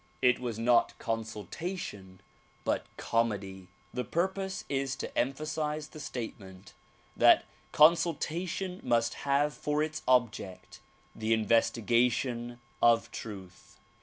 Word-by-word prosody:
It 125 -1 +4
was 120 -3 -4
not 120 +1 +3
consultation 110 - -5 0.4
but - - -1
comedy. 100 -5 -1 0.3
The 125 - -2
purpose 190 - -2
is 135 -1 -1
to - - -6
emphasize 150 +3 -1
the 155 - -11
statement 100 -8 -7 0.4
that - - +6 0.3
consultation 170 +3 +2
must 115 0 +1 0.2
have 145 +2 +3
for 150 +1 0
its 155 0 -4
object 120 -7 0 0.4
the 110 +1 +1
investigation 120 +2 +1 0.2
of 115 -1 +4
truth. 95 -5 -9
120 Hz, 105 wpm, -30 LUFS, 110-150 Hz, 0.4 s, that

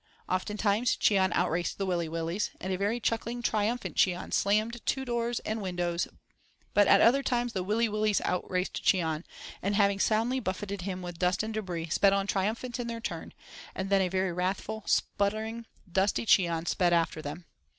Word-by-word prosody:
Oftentimes 210 +4 +1
Cheon 190 -3 +3
outraced 175 0 0
the 195 - -1
Willy 175 -3 -1
Willys, 165 +4 -2
and 190 0 -3
a - - +1
very 205 +5 0
chuckling, 235 +1 -2
triumphant 220 +3 0
Cheon 180 -1 +1
slammed 215 +4 +1
to 265 0 -1
doors 235 -1 -1
and 220 0 -3
windows, 175 -2 -1 0.7
but 205 -1 +5
at - - +6
other 260 +4 +5
times, 245 -3 -1
the 190 - -1
Willy 215 +5 +1
Willys 215 -1 +1
outraced 180 0 -2
Cheon, 160 -3 +2 0.4
and, 200 +2 0
having 200 -1 +3
soundly 230 +5 +2
buffeted 200 -2 -4
him 185 0 -4
with 175 -1 -7
dust 180 +2 +1
and 220 0 -4
debris, 175 -6 -4
sped 195 +4 +4
on 195 0 +1
triumphant 220 +5 -1
in 240 - -3
their 230 -1 -4
turn, 230 - -5 0.4
and 190 +1 -4
then 195 -1 +5
a 185 - +2
very 185 -1 0
wrathful, 190 +5 -2
spluttering, 220 +3 0 0.2
dusty 195 +5 +1
Cheon 170 -6 +3
sped 175 -2 +2
after 165 -2 +1
them. 155 +4 -7
200 Hz, 175 wpm, -29 LUFS, 180-220 Hz, 0.7 s, at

